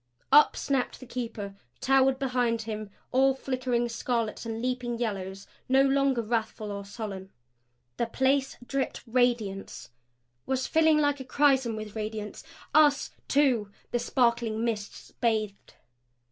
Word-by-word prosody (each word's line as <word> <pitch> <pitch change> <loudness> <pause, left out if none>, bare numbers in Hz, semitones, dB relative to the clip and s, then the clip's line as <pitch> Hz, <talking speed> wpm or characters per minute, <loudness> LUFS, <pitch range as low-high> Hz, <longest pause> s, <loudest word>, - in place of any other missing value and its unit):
Up 300 - +7
snapped 270 -3 -1
the 255 - -10
Keeper; 230 -5 -5 0.3
towered 270 0 +3
behind 250 -4 0
him, 215 -1 -5 0.2
all 265 +1 +4
flickering 255 -3 -1
scarlets 230 -1 -2
and 225 0 -3
leaping 250 -1 -2
yellows 195 -4 -4 0.2
no 265 +1 +5
longer 275 -3 +2
wrathful 220 -1 -2
or 200 0 -5
sullen. 200 -2 -7 0.7
The 235 - 0
place 265 +3 +1
dripped 275 +1 -2
radiance; 235 - -1 0.6
was 260 -1 0
filling 320 -1 +4
like 290 -1 +2
a - - -5
chrisom 265 -3 +2
with 215 -1 -7
radiance. 215 -1 -5 0.3
Us, 295 -2 +4 0.2
too, 255 -8 +2 0.2
the 240 - +1
sparkling 235 -3 +1
mists 210 -3 -4
bathed. 215 -4 -2
240 Hz, 130 wpm, -28 LUFS, 220-265 Hz, 0.7 s, Up